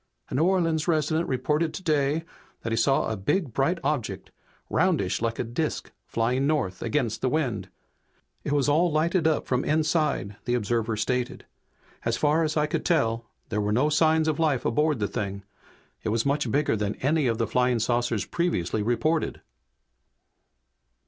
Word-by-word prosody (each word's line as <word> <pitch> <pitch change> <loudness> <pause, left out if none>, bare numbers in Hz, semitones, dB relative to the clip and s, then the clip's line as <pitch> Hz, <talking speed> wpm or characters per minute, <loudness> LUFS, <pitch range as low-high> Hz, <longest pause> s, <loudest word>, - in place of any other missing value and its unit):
"A - - -7
New 145 +6 +3
Orleans 165 -4 +1
resident 160 0 +1
reported 150 +5 0
today 155 -3 0 0.4
that 115 - -3
he - - +2
saw 135 +4 +2
a - - -1
big 125 - -1
bright 140 +8 +1
object 110 - -2 0.4
'roundish 160 - +1
like 115 0 -1
a - - -1
disk' 125 +7 -3 0.2
flying 125 +4 0
north, 125 -12 -1
against 120 -1 -1
the 130 - +1
wind. 120 -11 -1 0.7
'It - - -3
was 145 -2 +2
all 160 +4 +3
lighted 165 +2 +2
up 155 - +1
from 125 0 0
inside!' 155 - 0
the 120 - +1
observer 115 -1 -1
stated. 125 +3 -2 0.6
'As 115 0 0
far 150 +5 +2
as 155 0 -1
I 150 - +3
could 150 - -2
tell 115 -9 +1 0.2
there 105 - 0
were 105 0 0
no 130 +8 +3
signs 160 +1 +3
of 155 -1 0
life 150 -6 +1
aboard 150 +4 +2
the 105 -2 -1
thing. 100 -1 -4 0.6
It 110 - -2
was 115 +1 0
much 145 +1 +1
bigger 145 -3 +1
than 105 -1 -2
any 145 +1 +1
of 115 -2 0
the 115 - +1
flying 125 +3 +2
saucers 120 -2 0
previously 110 - -1
reported!'" 155 +9 0
135 Hz, 170 wpm, -26 LUFS, 115-155 Hz, 0.7 s, New